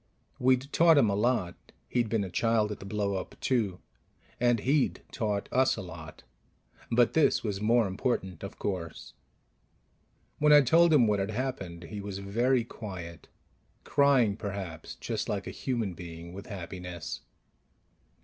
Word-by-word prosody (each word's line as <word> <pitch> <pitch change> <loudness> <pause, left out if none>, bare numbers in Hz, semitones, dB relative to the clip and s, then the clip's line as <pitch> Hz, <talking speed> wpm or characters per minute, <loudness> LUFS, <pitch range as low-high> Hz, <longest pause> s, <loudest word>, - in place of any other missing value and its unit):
We'd 130 +2 +2
taught 165 -2 +6
him 115 -7 +4
a - - 0
lot 105 -5 +1 0.3
he'd 120 -3 0
been 110 -2 +1
a 95 - -6
child 110 0 +1
at 105 - -6
the 95 - -9
blow 100 -1 -1
up, 95 - -5
too 110 -8 0 0.6
and 120 -2 +3
he'd 140 0 +1
taught 105 -4 -2
us 130 -1 +3
a 105 - -5
lot. 80 -3 -10 0.7
But 120 0 +4
this 160 -2 +3
was 105 -3 -3
more 115 +2 +4
important, 95 -3 -2
of 100 - -7
course. 90 -5 -5 1.3
When 150 0 +4
I 145 0 +9
told 165 +5 +5
him 140 -6 +6
what 105 -2 +2
had 95 +1 -1
happened, 105 -8 -4
he 100 +5 -7
was 100 -1 -5
very 120 +6 +1
quiet; 90 -8 -8 0.6
crying, 135 -8 +3
perhaps, 95 -6 -6
just - - -4
like - - -2
a - - -5
human 115 -7 -2
being, 85 0 -9
with 100 +5 -9
happiness. 90 -4 -6
105 Hz, 155 wpm, -29 LUFS, 95-125 Hz, 1.3 s, I